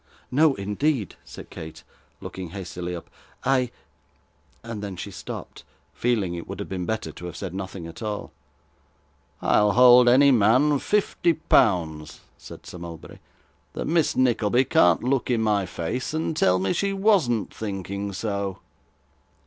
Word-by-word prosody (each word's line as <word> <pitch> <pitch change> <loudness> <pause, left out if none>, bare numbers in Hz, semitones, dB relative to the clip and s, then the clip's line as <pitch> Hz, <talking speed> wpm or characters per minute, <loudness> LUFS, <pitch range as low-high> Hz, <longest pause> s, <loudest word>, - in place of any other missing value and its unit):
'No, 145 +2 +4
indeed,' 105 - -1
said - - -11
Kate, 80 0 -9 0.4
looking 95 -2 -7
hastily 90 -1 -6
up, 85 - -9 0.4
'I 130 -2 +2 0.5
' - - -37
and 115 -2 -6
then 100 -2 -5
she 100 +3 -7
stopped, - - -8 0.3
feeling 110 -7 0
it 85 -1 -6
would - - -7
have - - -5
been 90 -2 -4
better 110 -8 -2
to 90 - -8
have 85 - -8
said 95 -3 -5
nothing 95 -2 -6
at 85 +8 -10
all. 105 -2 -4 1.1
'I'll 105 -1 +3
hold 125 0 +7
any 140 +3 +6
man 130 +6 +4
fifty 195 -3 +1
pounds,' 90 - +1
said - - -12
Sir 90 - -9
Mulberry, 85 -2 -10 0.5
'that - - -4
Miss 160 -2 +1
Nickleby 125 -1 +2
can't 90 -7 +4
look 130 +1 0
in 115 -3 +1
my 105 -3 +1
face, 115 - -4
and 160 0 -1
tell 90 - +3
me 95 0 0
she 200 0 0
wasn't 195 - +2
thinking 100 -1 -4
so. 100 -1 -3
105 Hz, 150 wpm, -24 LUFS, 95-130 Hz, 1.1 s, hold